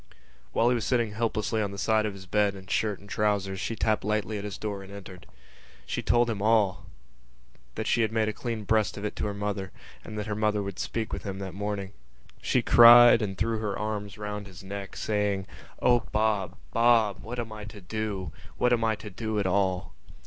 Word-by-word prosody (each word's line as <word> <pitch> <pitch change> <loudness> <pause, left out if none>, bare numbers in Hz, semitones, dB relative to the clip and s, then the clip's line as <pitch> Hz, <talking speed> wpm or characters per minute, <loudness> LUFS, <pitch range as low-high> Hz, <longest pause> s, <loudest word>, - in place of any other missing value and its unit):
While 115 - +3
he - - +3
was 120 -3 -1
sitting 115 -1 +1
helplessly 110 0 -1
on 100 - -1
the 100 - -8
side 110 +1 +2
of 100 -2 -6
the 95 - -13
bed 105 +1 +2
in 95 -1 -11
shirt 105 +1 -1
and 100 - -15
trousers 100 -2 0
she 115 +3 -3
tapped 110 -1 +1
lightly 105 0 -1
at - - -6
his 105 -2 -5
door 105 -2 -4
and 95 0 -12
entered. 95 -3 -10 0.6
She - - -3
told 120 0 +3
him 110 -4 -2
all, 100 -3 +2 0.9
that - - -3
she 120 - +2
had 110 -1 +1
made 110 -1 +1
a 110 - -1
clean 115 -2 -4
breast 110 0 +1
of 100 - -5
it 105 - -3
to - - -1
her 100 - -3
mother 100 -1 -3 0.3
and 110 - -8
that 105 - -3
her 105 - -3
mother 105 -1 0
would 100 -2 -6
speak 110 +5 -3
with - - -3
him 95 -2 -5
that 95 -2 -6
morning. 100 0 -4 0.5
She - - +1
cried 120 0 +9
and 95 -3 -3
threw 110 +1 0
her 105 -2 -2
arms 105 -1 -4
round 105 -1 -5
his 95 -1 -12
neck, 100 0 -7
saying: 105 -2 -1 0.4
"O 120 -1 +5
Bob! 105 -4 0 0.2
Bob! 115 -3 +4
What 120 +3 -7
am 115 -2 -4
I 105 -1 -7
to 105 0 -10
do? 100 -1 -4 0.3
What 125 0 +3
am 115 -1 +1
I 110 -1 +2
to 105 0 -10
do 110 +3 -3
at 100 - 0
all?" 95 -1 0
105 Hz, 220 wpm, -27 LUFS, 100-110 Hz, 0.9 s, cried